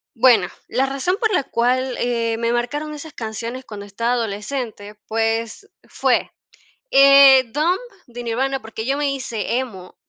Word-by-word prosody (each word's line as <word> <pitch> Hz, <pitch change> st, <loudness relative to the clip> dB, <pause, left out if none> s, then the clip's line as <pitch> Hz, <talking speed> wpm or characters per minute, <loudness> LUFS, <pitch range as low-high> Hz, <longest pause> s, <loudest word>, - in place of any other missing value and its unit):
Bueno, 225 Hz, -6 st, +5 dB, 0.2 s
la 265 Hz, -, 0 dB
razón 275 Hz, +8 st, -1 dB
por 445 Hz, -3 st, +1 dB
la 320 Hz, -, +2 dB
cual, 255 Hz, +1 st, 0 dB
eh, 230 Hz, -2 st, -1 dB
me 230 Hz, 0 st, 0 dB
marcaron 290 Hz, +6 st, -2 dB
esas 300 Hz, +1 st, -9 dB
canciones 230 Hz, +3 st, -6 dB
cuando 205 Hz, -2 st, -9 dB
estaba 230 Hz, +5 st, -2 dB
adolescente, 215 Hz, -1 st, -4 dB
pues 225 Hz, -, -2 dB, 0.2 s
fue, -, -, 0 dB, 0.6 s
eh, 275 Hz, -1 st, +8 dB
Dump 330 Hz, +6 st, +1 dB, 0.3 s
de 240 Hz, 0 st, -8 dB
Nirvana, 265 Hz, +3 st, -1 dB
porque 220 Hz, 0 st, -7 dB
yo 275 Hz, +2 st, 0 dB
me 290 Hz, -1 st, 0 dB
hice 235 Hz, -3 st, -3 dB
emo, 195 Hz, -8 st, -6 dB
245 Hz, 150 wpm, -20 LUFS, 225-275 Hz, 0.6 s, eh